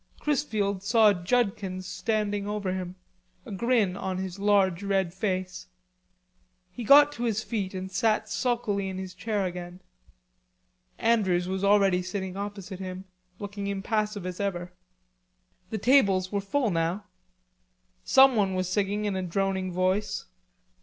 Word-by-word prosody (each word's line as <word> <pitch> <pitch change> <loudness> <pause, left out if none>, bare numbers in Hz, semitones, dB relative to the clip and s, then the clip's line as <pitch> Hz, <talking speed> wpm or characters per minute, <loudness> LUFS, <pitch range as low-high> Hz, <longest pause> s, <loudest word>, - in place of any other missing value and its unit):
Chrisfield 215 -10 -1
saw 215 +1 +5
Judkins 190 -1 -1
standing 205 +2 -2
over 205 -3 -2
him, 185 -1 -5 0.5
a 235 - -9
grin 210 -2 +1
on 190 -1 -3
his 190 0 -5
large 200 -3 +3
red 195 -3 0
face. 185 -1 -3 1.0
He 235 +6 -7
got 290 +5 +7
to 240 -4 -6
his 215 -2 0
feet 200 -5 -3
and 185 0 -5
sat 215 +2 +1
sulkily 210 -4 -1
in 190 - -5
his 190 -1 -6
chair 200 +2 -2
again. 180 0 -6 1.2
Andrews 190 -6 +2
was 190 +1 -3
already 200 -2 +4
sitting 185 0 -4
opposite 200 -1 -6
him, 185 0 -6 0.3
looking 205 -1 -5
impassive 205 0 -2
as 185 -1 -5
ever. 180 -3 -3 1.0
The 220 - -3
tables 200 -6 +3
were 200 -1 -1
full 225 +3 0
now. 170 +4 -1 1.0
Someone 230 -8 +5
was 185 -1 -1
singing 205 +2 -1
in 205 -2 -1
a 190 - -1
droning 190 +1 -1
voice. 185 +4 0
195 Hz, 135 wpm, -27 LUFS, 185-210 Hz, 1.2 s, got